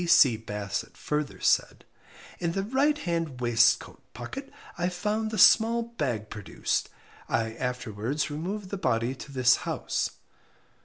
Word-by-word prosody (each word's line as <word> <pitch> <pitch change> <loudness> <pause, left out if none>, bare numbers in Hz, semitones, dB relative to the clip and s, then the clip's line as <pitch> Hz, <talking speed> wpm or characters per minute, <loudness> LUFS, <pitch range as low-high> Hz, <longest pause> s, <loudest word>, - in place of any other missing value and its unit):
P.C. 140 -8 +6
Bassett 105 -2 -5
further 150 -1 -2
said - - +1 0.5
In 170 -1 -1
the 195 - -1
right 275 +7 +2
hand 165 - -2
waistcoat 120 -2 +2
pocket - - -7 0.2
I 175 +1 0
found 210 +5 -1
the 215 - -4
small 230 +2 +6
bag 130 - -3
produced. 105 -3 -2 0.4
I 110 0 0
afterwards 125 +3 -3
removed 185 +6 -4
the 200 - -2
body 115 -8 0
to 135 +2 -10
this 125 -2 +4
house. - - -2
150 Hz, 135 wpm, -28 LUFS, 120-200 Hz, 0.5 s, P.C